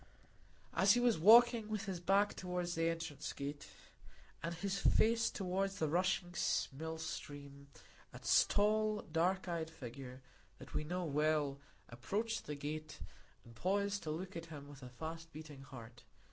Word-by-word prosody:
As - - +5
he 245 - +3
was 240 -6 +3
walking 230 +3 +7
with 215 0 -2
his 190 -3 -3
back 195 +4 +3
toward 180 -1 -2
the 165 -1 +1
entrance 165 -4 -4
gate, 140 +1 -5 0.7
and 170 +1 -3
his 195 +3 -2
face 230 +3 +4
toward 195 0 -1
the 160 -5 -1
rushing 175 +2 +1 0.4
mill 160 +3 -5
stream, 145 -3 -7 0.4
a - - -9 0.3
tall, 215 +1 +2
dark 180 +4 0
eyed 165 -2 -2
figure, 130 -2 -9 0.3
that - - -12
we 150 - 0
know 175 +3 -2
well, 150 -2 +1 0.3
approached 205 - -3
the 150 - -3
gate, 155 +2 -5 0.5
and 115 - -13
paused 200 - 0
to 155 - -5
look 180 +5 -4
at 165 0 -6
him 145 -3 -9
with 145 -1 -12
a 125 - -8
fast 160 +5 -7
beating 155 -3 -9
heart. 120 -4 -11
165 Hz, 155 wpm, -37 LUFS, 145-195 Hz, 0.7 s, walking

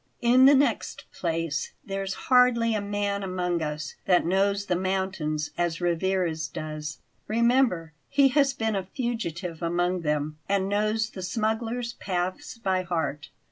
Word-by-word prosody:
In 250 +2 +6
the 280 +1 +8
next 280 +1 0
place, 165 -3 -2
there's 195 -1 -3
hardly 250 -3 +4
a 215 - 0
man 200 0 -1
among 180 -3 -1
us 150 0 -4
that 180 -2 +4
knows 200 +3 +1
the 180 - 0
mountains 185 -5 -1
as 170 -1 0
Rivarez 175 -2 0
does. 155 -1 -6 0.3
Remember, 230 - +2 0.2
he 275 -1 +5
has 275 0 +3
been 225 -5 -1
a 195 - 0
fugitive 180 - -3
among 175 +1 0
them, 150 -1 -1
and 195 -1 +2
knows 215 +2 0
the 190 - -7
smugglers' 225 +4 -1
paths 185 0 -3
by 190 -5 0
heart. 160 -5 -3
190 Hz, 140 wpm, -26 LUFS, 170-225 Hz, 0.3 s, the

